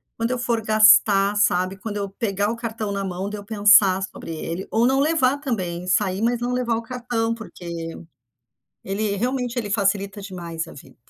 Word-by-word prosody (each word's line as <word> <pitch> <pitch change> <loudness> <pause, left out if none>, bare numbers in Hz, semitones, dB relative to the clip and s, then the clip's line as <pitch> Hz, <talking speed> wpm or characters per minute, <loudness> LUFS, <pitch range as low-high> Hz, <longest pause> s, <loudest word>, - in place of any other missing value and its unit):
quando 230 +1 -2
eu 255 - -1
for 235 -2 0
gastar, 215 -2 +5
sabe, 185 -2 +2
quando 210 0 -5
eu 200 -1 -3
pegar 200 0 -1
o 230 - -2
cartão 225 -3 -4
na 200 0 -2
mão 190 +1 -4
de 210 - -5
eu 205 - -8
pensar 205 -2 +5
sobre 190 - -7
ele, 165 +4 -5
ou 230 +2 +3
não 270 +1 +2
levar 285 -3 +2
também, 185 -11 -3
sair, 190 +1 +1
mas 235 +1 +1
não 245 +1 -2
levar 245 -2 0
o - - -3
cartão, 235 -1 -2
porque 220 -5 -11 1.2
ele, 200 +1 -2
realmente, 250 +2 -2
ele 210 -4 -3
facilita 200 -1 0
demais 170 -4 -6
a - - -11
vida. - - -15
210 Hz, 190 wpm, -22 LUFS, 195-235 Hz, 1.2 s, gastar